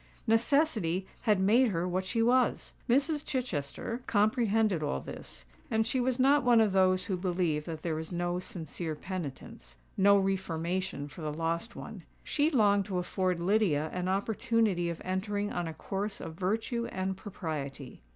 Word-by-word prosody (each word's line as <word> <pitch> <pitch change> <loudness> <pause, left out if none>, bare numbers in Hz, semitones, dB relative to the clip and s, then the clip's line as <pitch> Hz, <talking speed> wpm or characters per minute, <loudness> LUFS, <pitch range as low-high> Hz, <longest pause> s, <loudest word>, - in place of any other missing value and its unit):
Necessity 225 - +2 0.2
had 210 -3 +3
made 225 +7 +5
her 180 -4 -1
what 185 +1 -1
she 225 +4 +1
was! 250 +1 +2 0.2
Mrs. 285 +4 +2
Chichester 230 - -3
comprehended 215 - +2
all 65 - -1
this; 65 - -9 0.2
and 220 0 +2
she 250 +3 0
was 250 0 +1
not 275 +3 +4
one 240 -2 +5
of 215 -2 +4
those 185 -1 +3
who 190 - -1
believe 175 -4 -1
that 160 -2 -6
there 160 -2 -1
is 160 +2 -7
no 175 0 -1
sincere 160 -2 -5
penitence—no 150 - -1
reformation 185 -4 -1
for 150 +4 -11
the 155 -1 -2
lost 165 +7 -2
one. - - -8 0.2
She 295 +1 +1
longed 205 - +3
to 190 -3 -3
afford 180 0 0
Lydia 170 -5 +2
an 180 0 -2
opportunity 205 -2 +1
of 170 - -6
entering 205 +2 -2
on 175 -1 -2
a 160 - -5
course 200 +5 -4
of 160 - -6
virtue 225 +7 -1
and 190 0 -2
propriety. 150 - -6
190 Hz, 160 wpm, -30 LUFS, 170-225 Hz, 0.2 s, made